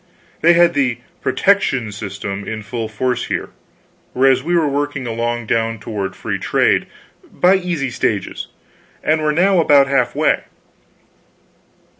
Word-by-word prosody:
They 170 +1 +6
had 170 0 +4
the 130 -5 +1 0.2
"protection" 130 - +1
system 100 0 -6
in 110 -1 -5
full 115 +1 -4
force 125 +3 -1
here, - - -3 0.6
whereas 130 0 +3
we 175 +5 -1
were 165 -3 +3
working 145 -1 -2
along 120 0 -2
down 115 +1 0
toward 100 -3 -5
free - - -4
trade, - - +1 0.4
by 180 +1 +3
easy 175 -8 -1
stages, 105 -4 -2 0.6
and 155 +1 +2
were 150 0 +1
now 185 +4 +3
about 145 -4 +5
half 135 0 +1
way. - - +1
130 Hz, 135 wpm, -18 LUFS, 115-155 Hz, 0.6 s, They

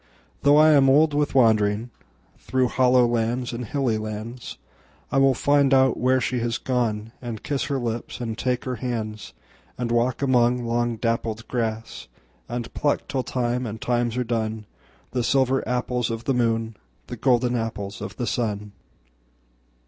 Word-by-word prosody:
Though 145 +1 +5
I 155 +1 +7
am 140 -3 +5
old 150 +3 +4
with 145 0 0
wanderingThrough 110 - 0
hollow 125 -1 +4
lands 120 +1 -1
and 120 +1 -4
hilly 120 -2 0
lands,I 110 +5 -6
will 135 -1 +4
find 140 0 +3
out 130 -1 +4
where 130 +1 +3
she 125 0 -1
has 115 0 -1
gone, 115 -4 -1
And 115 -4 -6
kiss 140 -2 -1
her 140 - -1
lips 120 -1 -4
and 115 -2 -3
take 125 +1 -2
her 125 -2 -3
hands; 110 - -5 0.4
And 120 -1 -2
walk 120 +3 +1
among 125 -2 +2
long 120 0 0
dappled 115 -1 -2
grass, 115 -2 -3 0.4
And 120 -1 -5
pluck 145 -1 0
till 135 - -1
time 125 -1 -2
and 110 +1 -6
times 120 0 0
are 125 - +1
done, 110 -2 -2 0.5
The 125 -1 -1
silver 135 +1 +2
apples 125 -1 -1
of 115 0 -4
the 135 - 0
moon, 115 -3 0 0.3
The - - -7
golden 125 -1 +2
apples 110 -3 -4
of - - -6
the 125 - -3
sun. 105 -4 -2
120 Hz, 155 wpm, -24 LUFS, 115-130 Hz, 0.5 s, I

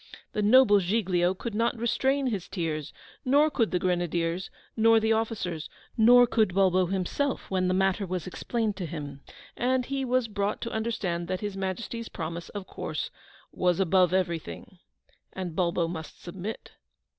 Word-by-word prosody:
The 210 - 0
noble 210 -1 +6
Giglio 185 -2 +1
could 230 +4 -5
not 235 +2 +1
restrain 265 +4 +1
his 205 -8 -2
tears, 155 -5 -3 0.3
nor 290 +4 +4
could 230 -6 +1
the 180 - +1
Grenadiers, 175 0 -1 0.3
nor 225 0 +5
the 220 0 +2
officers, 195 -8 -2 0.3
nor 245 +2 +7
could 215 -6 +1
Bulbo 185 -2 +3
himself, 195 +11 -2
when 185 -1 +1
the 185 - +1
matter 190 +1 +1
was 180 -2 -3
explained 220 +3 -2
to 180 -4 -4
him, 145 -3 -7 0.3
and 255 0 +1
he 275 +1 -2
was 255 -1 +1
brought 205 -1 -2
to 230 - -4
understand 195 -6 -2
that 185 0 -3
His 205 -2 -3
Majesty's 210 +4 -4
promise, 165 0 -5
of 205 -2 -6
course, - - -5 0.4
was 180 -1 +1
ABOVE 185 -1 +4
EVERY 180 -3 +1
THING, 175 +3 -11 0.5
and 180 -4 -5
Bulbo 170 -1 +1
must 160 -3 -7
submit. 190 +5 -7
190 Hz, 160 wpm, -27 LUFS, 175-225 Hz, 0.5 s, nor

